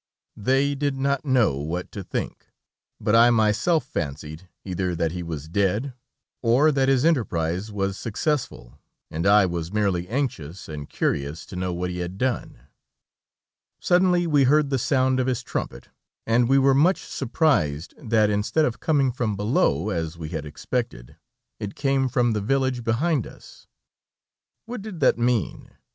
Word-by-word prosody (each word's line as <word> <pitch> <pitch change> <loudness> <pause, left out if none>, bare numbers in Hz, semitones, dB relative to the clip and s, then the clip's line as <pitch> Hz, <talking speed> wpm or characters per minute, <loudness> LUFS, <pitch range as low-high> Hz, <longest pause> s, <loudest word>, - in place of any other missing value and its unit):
They 135 +6 +1
did 140 -1 -1
not 140 +1 0
know 125 - +2
what 80 +5 -4
to 100 - -6
think, - - -5 0.5
but 105 - +1
I 115 +1 +7
myself 115 +8 +2
fancied, 75 +3 -5 0.2
either 90 -1 -2
that 80 -1 0
he 90 +1 -5
was 80 -3 -6
dead, 100 - 0 0.5
or 130 +6 +4
that 135 -2 +2
his 135 +1 +3
enterprise 95 - 0
was 100 -1 -2
successful, 110 - -3 0.3
and 80 +5 -1
I 100 0 +6
was 85 -1 -3
merely 100 -4 0
anxious 95 - -3
and 75 -2 -7
curious 70 +4 -2
to - - -10
know 90 0 -2
what 90 +1 -3
he 90 - -5
had 90 +2 -5
done. 125 - -2 1.2
Suddenly 180 -1 +3
we 145 -4 +3
heard 145 +1 +3
the 135 - +1
sound 130 +1 +2
of 130 - 0
his 125 -2 -1
trumpet, - - -5 0.4
and 120 +1 +2
we 135 - +5
were 135 0 +4
much 165 +8 +3
surprised 115 - 0
that 110 -5 +2
instead 105 +10 +1
of 120 - -3
coming 140 -5 +2
from 115 -4 -2
below, 100 - +1
as 85 -2 -3
we 80 -2 -6
had 80 -3 -5
expected, 80 - -4 0.4
it 105 -2 -5
came 135 -2 +1
from 120 -1 +1
the 105 - -1
village 130 +2 0
behind 130 +4 0
us. - - -15 1.0
What 235 -1 -6
did 200 -5 -8
that 130 - +3
mean? 120 -6 -1
115 Hz, 160 wpm, -24 LUFS, 90-135 Hz, 1.2 s, I